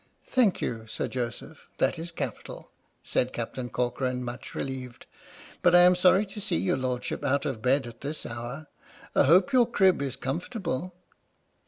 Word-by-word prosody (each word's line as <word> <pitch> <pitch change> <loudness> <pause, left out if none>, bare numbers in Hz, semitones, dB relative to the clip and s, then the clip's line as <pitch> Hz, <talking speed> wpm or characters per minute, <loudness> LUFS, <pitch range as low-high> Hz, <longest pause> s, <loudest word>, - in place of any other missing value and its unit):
" - - -42
Thank 235 -8 +2
you, 110 -1 -3
Sir - - -3
Joseph, 120 -2 -5
that - - +1
is 165 +1 -5
capital," 170 - -6 0.3
said 125 - 0
Captain 120 +1 -5
Corcoran, 125 +1 -1
much 120 +1 -7
relieved, 130 -3 -5 0.3
" - - -18
but 175 -1 +5
I 175 - +9
am 180 +1 +7
sorry 185 +3 +4
to 205 +1 -8
see - - -1
your 90 +4 +1
Lordship 130 +1 -3
out 140 0 +1
of 125 -6 -3
bed 130 +2 +2
at 120 -1 -11
this 145 +3 -5
hour. 120 +6 -6 0.5
I - - +4
hope 185 - +5
your 245 -3 +5
crib 190 -8 +3
is 135 -3 -2
comfortable." 175 - -3
135 Hz, 175 wpm, -27 LUFS, 125-180 Hz, 0.5 s, I